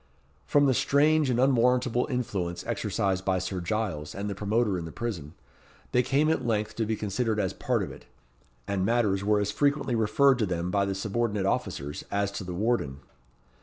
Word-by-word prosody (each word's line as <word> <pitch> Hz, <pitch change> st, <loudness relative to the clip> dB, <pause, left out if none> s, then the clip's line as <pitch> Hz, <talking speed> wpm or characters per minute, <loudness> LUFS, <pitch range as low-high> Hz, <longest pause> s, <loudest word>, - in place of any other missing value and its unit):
From 145 Hz, 0 st, +4 dB
the 135 Hz, -, +4 dB
strange 150 Hz, +3 st, +3 dB
and 120 Hz, -1 st, +1 dB
unwarrantable 125 Hz, -1 st, +3 dB
influence 100 Hz, -9 st, -2 dB
exercised 95 Hz, -2 st, -1 dB
by 95 Hz, -1 st, +1 dB
Sir 95 Hz, 0 st, -3 dB
Giles 85 Hz, -6 st, -3 dB
and 100 Hz, +1 st, -3 dB
the 100 Hz, -, -2 dB
promoter 105 Hz, +1 st, 0 dB
in 85 Hz, -, -5 dB
the 80 Hz, -, -7 dB
prison, 85 Hz, -10 st, -5 dB, 0.6 s
they 125 Hz, -, +4 dB
came 140 Hz, +4 st, +2 dB
at 160 Hz, -, 0 dB
length 105 Hz, -2 st, -1 dB
to 110 Hz, -2 st, 0 dB
be 110 Hz, -, 0 dB
considered 110 Hz, +1 st, -1 dB
as -, -, 0 dB
part -, -, 0 dB
of -, -, -5 dB
it; -, -, -13 dB, 0.6 s
and 100 Hz, -2 st, 0 dB
matters 105 Hz, -3 st, +1 dB
were 105 Hz, 0 st, +3 dB
as 100 Hz, 0 st, 0 dB
frequently 140 Hz, -3 st, +1 dB
referred 120 Hz, +4 st, +3 dB
to 110 Hz, -, +1 dB
them 90 Hz, 0 st, -2 dB
by 100 Hz, 0 st, +2 dB
the 100 Hz, 0 st, -2 dB
subordinate 105 Hz, 0 st, -1 dB
officers 95 Hz, -, -2 dB
as 100 Hz, 0 st, 0 dB
to 100 Hz, -, -5 dB
the 90 Hz, -1 st, -5 dB
warden. 90 Hz, -, -1 dB
105 Hz, 190 wpm, -27 LUFS, 95-120 Hz, 0.6 s, From